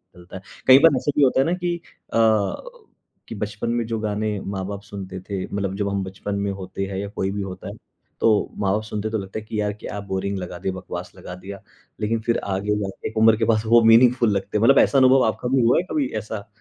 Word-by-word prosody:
बदलता 90 +1 -13
है। 95 - -7 0.3
कई 130 +1 +9
बार 160 -1 +6
ऐसा 145 - -1
भी 145 - +5
होता 130 -1 +3
है 135 - +4
ना 170 - +1
कि 175 -1 -1 0.4
अ, - - +1 1.1
कि - - -7
बचपन 105 +2 -4
में 120 0 0
जो 115 -1 -2
गाने 105 -1 -2
माँ-बाप 100 +1 -5
सुनते 100 -3 -8
थे, 95 0 -4
मतलब 100 -1 -3
जब 100 -1 -1
हम 100 -1 -1
बचपन 95 +2 -5
में 100 0 -1
होते 95 0 -5
हैं 95 -1 -5
या 100 +1 -4
कोई 95 - -1
भी 100 0 -3
होता 95 -2 -7
है, - - -7 0.5
तो 110 -2 +3
माँ-बाप 100 +2 0
सुनते 105 0 -4
हैं 110 - -5
तो 110 - 0
लगता 95 +3 -6
है 110 - -13
कि 110 0 -4
यार 105 0 -1
क्या 105 - -6
बोरिंग 100 +1 -2
लगा 90 -1 -6
दिया, 95 0 -2
बकवास 95 - -7
लगा 90 - -9
दिया। 95 +2 -9 0.4
लेकिन 110 +2 0
फिर 115 - +2
आगे 100 +2 -1
जाके 95 -1 -5
एक 110 - -10
उम्र 110 0 +6
के 110 - +1
पास 110 -1 +1
वो 115 +1 +6
मीनिंगफुल 120 0 +5
लगते 100 - -3
हैं। 105 - 0
मतलब 135 +4 +6
ऐसा 140 - +4
अनुभव 130 0 +6
आपका 110 +2 -2
भी 130 - +4
हुआ 120 +1 +4
है - - -1
कभी 150 -4 +1
ऐसा? 105 -1 -7
105 Hz, 245 wpm, -22 LUFS, 100-115 Hz, 1.1 s, कई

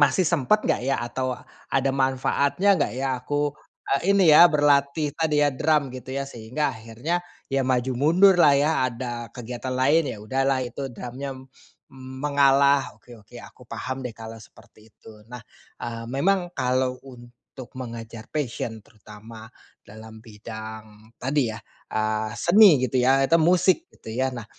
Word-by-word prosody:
masih 160 +6 +3
sempet 170 +6 +1
nggak, - - 0
ya, 135 - +1
atau 130 +1 -3 0.3
ada 135 0 +1
manfaatnya 140 +8 +1
nggak, 145 - 0
ya, 135 +1 -2
aku, 145 +2 -1 0.4
eee, 195 +8 +1
ini, 185 -6 +5
ya, 170 +3 +9
berlatih 145 -1 +2
tadi, 155 -2 +1
ya, 145 - +2
drum 145 -1 0
gitu, 130 +1 -8
ya, 140 - -2
sehingga 130 +3 -3
akhirnya, 115 +10 -4 0.3
ya, 135 - +2
maju 130 0 0
mundurlah, 170 +1 +5
ya, 145 +3 +2 0.2
ada 120 -1 -6
kegiatan 125 +1 -6
lain, 140 +4 +2
ya, 110 - -6
udahlah 135 +3 0
itu 135 +3 -6
drumnya 130 +3 -7 0.6
mengalah, 140 +1 +1
oke 120 -2 -16
oke 110 +4 -16
aku - - -15
paham, 130 +1 -5
deh, 120 -3 -6
kalau 115 0 -9
seperti 110 +4 -19
itu. 105 -1 -16
Nah, 125 0 -9 0.4
eee, 115 -1 -5
memang 175 +8 0
kalau 130 0 0
untuk 120 0 -13
mengejar 115 -3 -8
passion 120 -6 -4
terutama 110 +1 -14 0.4
dalam 110 +1 -13
bidang 110 0 -10
tadi, 130 -3 0
ya, 110 - -9 0.3
eee, 110 0 -1
seni 175 - +6
gitu, 130 0 -1
ya, 135 +2 +3
atau 165 - +5
musik 185 - +2
gitu, - - -15
ya. 130 +2 -1
Nah, 120 -3 -7
130 Hz, 150 wpm, -24 LUFS, 115-145 Hz, 0.6 s, ya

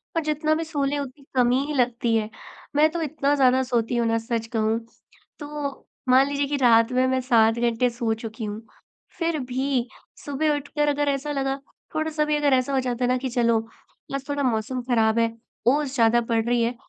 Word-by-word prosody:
पर 330 - +2
जितना 305 +1 0
भी 325 - -2
सो 310 -3 -2
लें 285 +1 0
उतनी 280 0 -7
कमी 250 0 +3
ही 300 - -4
लगती 240 -3 +1
है। 215 -1 0 0.5
मैं 305 +2 +5
तो 340 0 -3
इतना 290 -2 0
ज़्यादा 260 -1 +4
सोती 240 -2 -1
हूँ 235 -1 +1
ना 225 0 +2
सच 230 0 -3
कहूँ 220 +1 +1 0.6
तो। 290 -2 -5 0.3
मान 260 +2 +6
लीजिए 285 0 -1
कि 290 - -1
रात 230 -2 +4
में 255 +1 +2
मैं 260 0 +1
7 225 -3 +4
घंटे 240 +1 +2
सो 235 -1 -1
चुकी 220 0 -7
हूँ 210 +1 -5 0.6
फ़िर 335 -2 0
भी 260 -1 0 0.4
सुबह 295 +1 0
उठकर 295 +1 -2
अगर 290 0 +1
ऐसा 280 +1 -2
लगा 270 -1 -1 0.4
थोड़ा-सा 310 -1 0
भी 300 0 +1
अगर 295 -2 +2
ऐसा 260 +1 +1
हो 270 - +3
जाता 250 -1 -2
है - - +3
ना 255 - +3
कि 260 +1 -3
चलो 235 -2 +2 0.6
आज 275 0 -5
थोड़ा 285 0 -1
मौसम 250 +1 -1
ख़राब 225 -2 +3
है, 230 0 +2 0.4
ओस 280 +1 +2
ज़्यादा 235 -1 +4
पड़ 230 -1 0
रही 240 0 +1
है 235 +2 -1
260 Hz, 205 wpm, -24 LUFS, 235-285 Hz, 0.6 s, मान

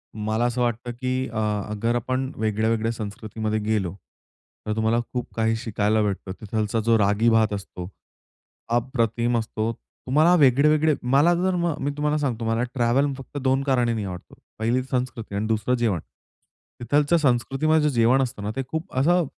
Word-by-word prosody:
मला 110 +2 -1
असं 120 +1 -1
वाटतं, 120 0 -1
की 130 +1 -2
अ, 110 - -6 0.3
अगर 115 +3 -1
आपण 130 +3 -2
वेगळ्या-वेगळ्या 110 +1 0
संस्कृतीमध्ये 110 0 -4
गेलो, 105 -4 -1 0.7
तर 105 - -2
तुम्हाला 110 +1 +1
खूप 125 -1 -4
काही 115 0 +1
शिकायला 110 -2 0
भेटतं. 100 -2 -2
तिथला 110 +1 -1
जो 115 +1 +3
रागी 105 +3 +3
भात 110 -2 +3
असतो, 95 -3 -6 0.8
अप्रतिम 120 -1 0
असतो. 110 0 -2 0.4
तुम्हाला 155 +7 +4
वेगळे-वेगळे 150 +2 +4 0.2
मला 150 +6 +5
जर 185 +1 0
मग 170 -3 0
मी 145 +1 0
तुम्हाला 150 +1 +1
सांगतो, 120 -6 -2
मला 115 +1 +1
ट्रॅव्हल 130 +3 +2
फक्त 135 +2 -9
2 135 0 +1
कारणानी 120 -5 +1
आवडतो. 90 -2 -8 0.2
पहिली 120 +3 +1
संस्कृती 125 -5 -3
आणि 105 +2 -1
दुसरं 110 +3 +1
जेवण. 115 -8 0 0.8
तिथल्या 145 +7 +2
संस्कृतीमध्ये 150 +3 +2
जे 140 - -4
जेवण 120 +4 +4
असतं 120 -5 -3
ना, 105 - -2
ते 135 - -2
खूप 160 +2 -5
असं 175 +5 +3
120 Hz, 160 wpm, -24 LUFS, 110-135 Hz, 0.8 s, मला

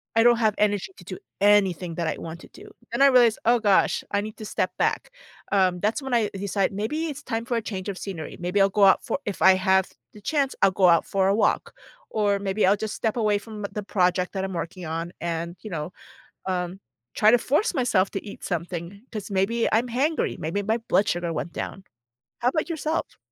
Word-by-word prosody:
I 225 - +5
don't 240 0 +6
have 215 -2 +2
energy 205 - +1
to - - -13
do - - -6 0.2
anything 195 -4 +3
that 170 - -2
I - - -2
want 165 +1 -8
to - - -14
do. - - -14 0.2
And - - -1
I 280 - +8
realized, 245 -4 +5
"Oh 240 +1 +4
gosh. 205 -3 +3
I 200 - +1
need 215 +1 -7
to 215 - -8
step - - -1
back." - - 0 0.4
Um, 185 -2 +3
that's 215 +9 0
when 265 -2 -4
I 225 -3 +2
decide, 195 0 -1
maybe 220 +11 -2
it's 295 -1 -6
time 230 -3 -3
for 240 -1 -1
a 230 - 0
change 195 -3 -5
of 195 - -4
scenery. 180 -6 -6
Maybe 180 +3 -1
I'll 195 - +5
go 200 +1 +2
out 190 -1 +6
for - - -2
if 205 - -4
I 190 - +8
have 190 0 +2 0.2
the 210 - -13
chance, 280 +3 0
I'll 195 - +5
go 185 -1 +4
out 170 -1 +4
for 190 -1 +1
a 200 - +3
walk. - - +1 0.4
Or 205 -2 +1
maybe 195 +1 0
I'll 195 +2 +5
just 215 0 -4
step 220 -2 -1
away 215 -3 +2
from 210 +1 -9
the 210 - -4
project 180 -2 +1
that 190 -1 -2
I'm 190 - -3
working 175 +1 -5
on, 165 +2 -4
and, 170 0 -3
you 215 - -8
know, 165 +2 -4 0.5
um, 180 0 -2 0.3
try 215 0 +5
to 245 - +6
force 300 - +1
myself 215 -8 +2
to 195 - -4
eat 205 - -10
something, 175 +3 -4
'cause 215 -2 -6
maybe 200 +5 +1
I'm 235 +3 +2
hangry, 285 +7 0
maybe 170 +6 -2
my 220 +3 0
blood 220 -3 +1
sugar 175 -1 -1
went 170 - -4
down. 195 - -6 0.6
How 240 - +2
about 310 +5 -1
yourself? 315 0 -2
200 Hz, 225 wpm, -25 LUFS, 185-225 Hz, 0.6 s, I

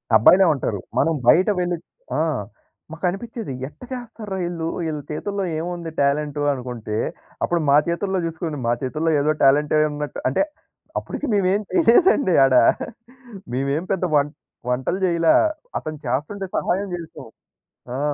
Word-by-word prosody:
అబ్బాయిలే 180 - +7
ఉంటారు. 115 -7 -2 0.2
మనం 165 - +3
బయట 180 +10 +6
వెళ్లి 175 -1 0 0.4
ఆ! - - +1 0.7
మాకు 160 +3 -5
అనిపిచ్చేది, 225 - -5
ఎట్ట 150 +1 -17
చేస్తార్రా 225 -5 -6
ఈళ్ళు! 165 -2 -3 0.2
ఈళ్ళ 155 -1 -3
చేతుల్లో 200 +6 -3 0.2
ఏముంది 170 0 -4
టాలెంటు 145 +1 +1
అనుకుంటే, 120 -5 -4 0.5
అప్పుడు 175 - +1
మా 140 - +7
చేతుల్లో 185 +3 -1
చూసుకుని 165 -2 -4
మా 120 - +3
చేతుల్లో 155 +5 0
ఏదో 150 +2 +2
టాలెంటే 145 +3 +4
ఉన్నట్టు 150 0 -5
అంటే 130 - +1 0.6
అప్పుడికి - - -5
మేమేమి 200 +1 +2
చేయలేదండి 315 - +4
ఆడ. 135 - +2 1.0
మేమేం 140 +6 -1
పెద్ద 185 -1 -1
వం 145 0 +4 0.4
వంటలు 130 +9 0
జేయలా. 170 -2 +3 0.5
అతను 155 0 -6
చేస్తుంటే 150 +11 -2
సహాయం 195 +3 0
చేసాం. 165 -6 -9 0.7
ఆ! - - -3
165 Hz, 130 wpm, -22 LUFS, 140-190 Hz, 1.0 s, అబ్బాయిలే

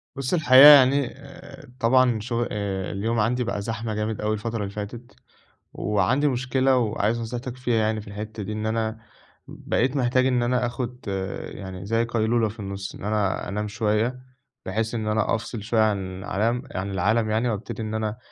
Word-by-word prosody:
بُصّ، 135 +2 -3
الحقيقة 140 -4 +8
يعني 140 -2 +7
آآ، 140 -1 -13
طبعًا 125 -1 +3
شغ 120 +2 -2
آآ، 100 -3 -3
اليوم 110 +3 -1
عندي 125 +4 +1
بقى 105 -3 -3
زحمة 115 +1 -4
جامد 105 0 -2
أوي 105 0 0
الفترة 115 +2 -3
اللي 100 - -4
فاتت، 105 +4 -7 0.6
وعندي 125 +8 +1
مشكلة 130 0 +1
وعايز 110 -1 0
نصيحتك 120 +2 -5
فيها 125 -2 0
يعني 110 0 +1
في 105 - -15
الحتة 105 +1 -6
دي، 105 - -5
إن 105 0 -3
أنا 110 0 -1 0.5
بقيت 130 +3 -1
محتاج 130 -1 +2
إن 125 -2 +2
أنا 125 0 +1
آخد 125 +1 -5 0.5
يعني 95 -2 -8
زي 115 +3 +1
قيلولة 115 -1 +1
في 110 +2 -12
النُصّ، 100 -1 -6
إن - - -11
أنا 105 -2 -1
أنام 105 +2 -2
شوية، 110 +3 0 0.5
بحيث 110 +4 -2
إن 110 -2 -3
أنا 110 +1 +1
أفصِل 110 -1 -6
شوية 115 +1 +1
عن 95 -3 -1
علم 115 +6 0
عن 95 +2 -3
العالم 110 +4 +1
يعني 110 +3 +1
وأبتدي 115 +1 -4
إن 110 -1 -4
أنا 110 0 -2
110 Hz, 175 wpm, -24 LUFS, 105-125 Hz, 0.6 s, الحقيقة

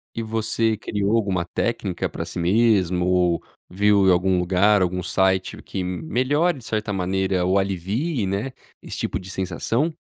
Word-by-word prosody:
E 115 - -2
você 110 0 0
criou 105 0 -1
alguma 95 -6 0
técnica 95 0 -2
pra - - -5
si - - -7
mesmo 90 -2 +2
ou 90 -2 +2 0.3
viu 100 +1 +3
em - - +7
algum 90 +1 +3
lugar, 95 +3 +3
algum 90 0 -1
site 95 0 0
que 95 -2 -4
melhore 145 - 0
de 120 - -13
certa 105 -2 -2
maneira 95 -1 0
ou 95 +2 +3
alivie, 100 - -1
né, 100 +7 -2 0.3
esse - - -7
tipo - - -2
de 95 +1 -10
sensação? 105 - -1
95 Hz, 160 wpm, -23 LUFS, 90-110 Hz, 0.3 s, em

